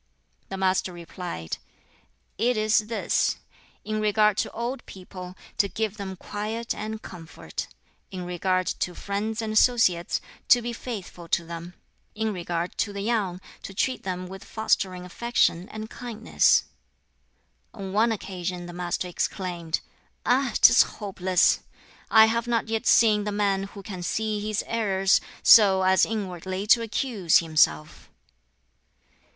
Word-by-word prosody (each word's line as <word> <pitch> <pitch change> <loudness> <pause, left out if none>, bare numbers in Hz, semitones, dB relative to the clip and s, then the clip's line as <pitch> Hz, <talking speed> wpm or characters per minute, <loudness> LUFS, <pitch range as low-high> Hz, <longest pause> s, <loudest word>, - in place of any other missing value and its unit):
The 195 - -5
Master 190 -1 +1
replied, 170 - -6 0.8
"It 240 +1 +2
is 215 0 +2
this: 225 - 0 0.5
in 215 0 -2
regard 210 0 +3
to - - 0
old 240 +3 -4
people, 185 -1 -10 0.2
to 200 - +3
give 215 0 -3
them 195 -2 -5
quiet 215 +5 -4
and 220 +1 -5
comfort; 165 -2 -7 0.4
in 185 -2 -6
regard 185 +1 0
to 175 0 -2
friends 215 +3 -3
and 215 -1 -3
associates, 215 -7 +3 0.3
to 245 - +7
be 240 0 -3
faithful 200 -8 -7
to 170 0 0
them; 170 +1 -8 0.4
in 220 0 -1
regard 175 -1 -3
to 205 - 0
the 200 0 -5
young, 200 -5 -1 0.2
to 195 - -9
treat 255 +6 0
them 185 -1 -4
with 190 +1 -9
fostering 185 -4 -1
affection 180 -3 0
and 215 0 -7
kindness." 230 -2 +2 1.1
On 195 -4 -7
one 225 +3 +3
occasion 180 -4 -4
the 175 - -8
Master 175 +1 -3
exclaimed, 175 -2 -3 0.4
"Ah, 250 +1 +2
'tis - - +8 0.2
hopeless! 185 -3 +2 0.5
I 220 0 +8
have 230 +1 0
not 230 -2 0
yet 225 -1 -1
seen 215 -2 +5
the 210 - -2
man 200 -1 0
who 200 0 -11
can 185 -3 -7
see 215 +4 -1
his 210 0 -2
errors, 195 -4 +2 0.2
so 195 -4 +7
as 190 0 +4
inwardly 190 -2 -4
to 230 +2 +5
accuse 215 -5 +2
himself." 155 - +1
200 Hz, 140 wpm, -26 LUFS, 180-220 Hz, 1.1 s, tis